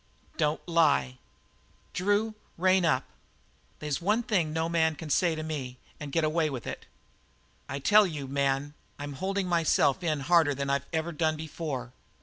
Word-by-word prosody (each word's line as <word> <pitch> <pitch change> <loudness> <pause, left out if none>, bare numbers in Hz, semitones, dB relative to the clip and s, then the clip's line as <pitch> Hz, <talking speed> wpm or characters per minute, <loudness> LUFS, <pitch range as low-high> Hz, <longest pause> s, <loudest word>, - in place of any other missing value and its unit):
"Don't 150 +3 -1
lie." 70 - +2 0.7
"Drew, 205 +4 +1 0.2
rein 185 +1 +3
up. 135 -6 +2 0.7
They's 150 0 -3
one 210 +6 +2
thing 185 -10 +1
no 160 +1 0
man 160 -2 +2
can 155 -1 -7
say 170 +2 +3
to 155 - -4
me 135 -5 -5 0.2
and 145 -2 -6
get 165 +3 +1
away 155 0 +1
with 130 -4 -6
it." - - -6 0.8
"I 140 - -3
tell 210 +8 +5
you, 150 -5 -5
man, 140 +1 0 0.2
I'm 145 0 -6
holding 190 +5 -2
myself 165 -3 +2
in 155 -4 0
harder 160 -1 +4
than 140 0 -2
I've 140 0 -1
ever 160 +1 -1
done 155 0 0
before. 145 -5 -5
155 Hz, 160 wpm, -28 LUFS, 140-170 Hz, 0.8 s, tell